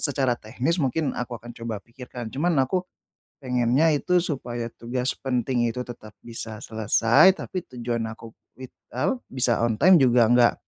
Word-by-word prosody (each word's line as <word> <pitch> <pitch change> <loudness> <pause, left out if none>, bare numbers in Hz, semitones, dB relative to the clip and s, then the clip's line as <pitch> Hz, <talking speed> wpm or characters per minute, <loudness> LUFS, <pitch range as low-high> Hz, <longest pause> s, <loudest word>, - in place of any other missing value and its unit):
secara 135 -4 +1
teknis 130 +10 -2
mungkin 145 +3 0
aku 125 0 -4
akan 120 +2 -11
coba 115 -2 -5
pikirkan. 120 -1 -9
Cuman 170 +5 0
aku 180 +7 -1 0.6
pengennya 125 +5 +2
itu 180 +5 +1
supaya 120 -7 -4
tugas 125 +2 -2
penting 125 -2 0
itu 125 +2 -4
tetap 110 -3 -11
bisa 115 -2 -5
selesai, 115 - +4
tapi 185 - -5
tujuan 120 -1 -2
aku 115 0 -10 0.2
wit 130 -1 -10 0.2
al 260 -2 0
bisa 125 -2 +1
on 115 -1 +1
time 185 - +6
juga 120 -2 +5
enggak 120 -1 +5
125 Hz, 155 wpm, -24 LUFS, 115-140 Hz, 0.6 s, time